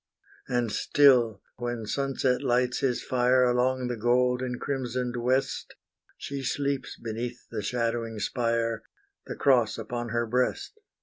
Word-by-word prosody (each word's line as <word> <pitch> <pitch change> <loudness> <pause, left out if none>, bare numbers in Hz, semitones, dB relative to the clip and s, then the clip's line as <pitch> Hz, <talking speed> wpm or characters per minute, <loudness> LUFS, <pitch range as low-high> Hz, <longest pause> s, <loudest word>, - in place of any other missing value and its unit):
And 120 -3 0
still, 125 -8 +4
when 120 -2 -3
sunset 135 +1 0
lights 125 -1 +1
his 125 -3 0
fire 125 0 +3
Along 125 +1 +2
the 120 - -2
gold 125 +2 +2
and 125 -1 -3
crimsoned 125 -2 -2
west, 125 +3 -1 0.4
She 140 -1 -5
sleeps 140 +1 -2
beneath 115 +1 -5
the 110 -2 -3
shadowing 115 0 -2
spire, 115 +2 0 0.5
The - - -5
cross 120 -6 +3
upon 120 +1 -4
her 120 +1 0
breast. 125 - -1
125 Hz, 130 wpm, -27 LUFS, 115-130 Hz, 0.5 s, still